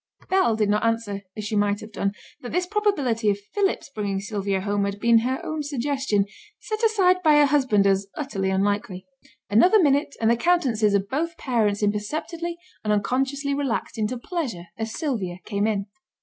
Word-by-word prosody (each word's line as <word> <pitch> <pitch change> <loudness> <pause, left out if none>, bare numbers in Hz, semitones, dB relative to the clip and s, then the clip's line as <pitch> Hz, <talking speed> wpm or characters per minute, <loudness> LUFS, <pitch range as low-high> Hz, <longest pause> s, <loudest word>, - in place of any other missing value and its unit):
Bell 375 -12 +3
did 215 -1 +1
not 210 +1 +1
answer, 225 -3 -1 0.2
as 215 - -4
she 215 - -2
might 205 0 +2
have 215 0 -10
done, 200 -2 -1 0.3
that 245 - -7
this 360 +1 0
probability 300 - +1
of 200 - +1 0.2
Philip's 390 -7 0
bringing 200 -2 -2
Sylvia 200 -1 -2
home 205 0 0
had 200 0 -4
been 230 +1 +5
her 255 +3 -1
own 310 -1 -3
suggestion, 270 -7 0 0.3
set 435 -1 -4
aside 390 -5 +4
by 310 -3 +5
her 295 0 +6
husband 265 -8 +3
as 195 0 +2
utterly 205 -10 -2
unlikely. 195 -1 -1 0.4
Another 355 - +5
minute 285 -3 +2
and 225 0 +3
the - - +4
countenances 235 - +2
of 200 0 0
both 330 +7 -2
parents 220 -6 0
imperceptibly 310 +12 -2 0.3
and 210 - 0
unconsciously 270 +7 0
relaxed 275 -4 -2
into 225 +2 -1
pleasure 245 - -4
as 225 0 -4
Sylvia 220 - -3
came 205 0 0
in. 200 -3 -1
230 Hz, 180 wpm, -24 LUFS, 205-290 Hz, 0.4 s, her